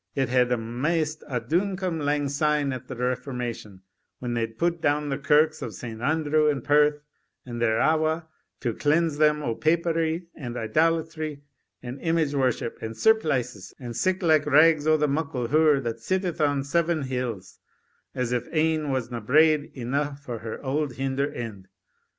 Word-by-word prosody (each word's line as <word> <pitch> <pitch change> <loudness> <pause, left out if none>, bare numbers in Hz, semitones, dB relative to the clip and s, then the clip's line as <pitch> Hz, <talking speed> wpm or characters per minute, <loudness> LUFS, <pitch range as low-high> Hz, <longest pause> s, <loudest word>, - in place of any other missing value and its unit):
It 135 -2 0
had 125 0 +3
amaist 150 +7 -1
a 125 -4 -1
douncome 180 - -1
lang 145 0 +1
syne 145 0 +1
at 130 0 -7
the 130 - -6
Reformation, 125 -5 -4 0.4
when 120 -1 -4
they 115 -1 0
pu'd 170 +9 -2
doun 145 0 +1
the 135 0 -2
kirks 150 +2 +3
of 115 -7 -5
St. 115 0 -7
Andrews 155 +2 +2
and 135 -4 -4
Perth, 150 0 +3 0.4
and 120 -2 -6
thereawa', 155 +8 +2 0.4
to 120 -4 -1
cleanse 155 +2 +1
them 150 -1 +3
o' 115 - -1
Papery, 165 +3 0
and 125 -5 -6
idolatry, 155 +4 0 0.4
and 125 +2 -7
image 165 -3 +1
worship, 130 -4 -1
and 110 0 -6
surplices, 130 - +1
and 120 -3 -7
sic 185 - 0
like 155 -3 +3
rags 155 +1 +5
o' 155 0 +5
the 150 0 +1
muckle 140 -5 -2
hure 155 0 +4
that 115 -3 -4
sitteth 185 - -2
on 145 -2 +2
seven 165 +1 0
hills, 120 -8 -4 0.6
as 125 -2 -1
if 125 -1 -1
ane 155 -2 +1
wasna 120 -3 -2
braid 155 +5 +3
eneugh 140 +3 -2
for 125 -5 -7
her 110 0 -6
auld 140 0 -1
hinder 135 +2 -1
end. 110 -8 -7
145 Hz, 160 wpm, -25 LUFS, 125-155 Hz, 0.6 s, rags